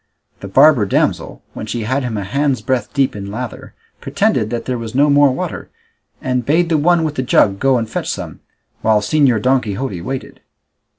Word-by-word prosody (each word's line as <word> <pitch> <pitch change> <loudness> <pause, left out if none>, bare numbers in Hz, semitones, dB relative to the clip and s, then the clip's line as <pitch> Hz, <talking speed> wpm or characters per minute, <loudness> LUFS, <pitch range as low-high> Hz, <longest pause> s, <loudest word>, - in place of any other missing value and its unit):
The 100 - -8
barber 135 0 +5
damsel, - - -1
when 110 - -7
she 115 +1 -3
had 130 +6 -1
him 120 -4 -3
a 100 - -3
hand's 135 +3 -1
breadth 125 -2 -1
deep 135 -5 0
in 100 -1 -6
lather, 115 +2 -7 0.2
pretended 110 - 0
that 120 0 -4
there 125 -2 -2
was 115 0 -7
no 145 +2 +4
more 145 0 +5
water, 130 - -5 0.5
and 125 -1 -1
bade 165 +7 +1
the 160 - +2
one 170 +2 +3
with 155 -2 -1
the 130 - -2
jug 100 -6 +2
go 135 -1 +3
and 115 -2 -2
fetch - - -4
some, - - -5 0.4
while 110 -1 +3
Señor 125 +1 +2
Don 130 0 +3
Quixote 105 -3 -4
waited. 130 +8 -6
125 Hz, 195 wpm, -17 LUFS, 110-140 Hz, 0.5 s, barber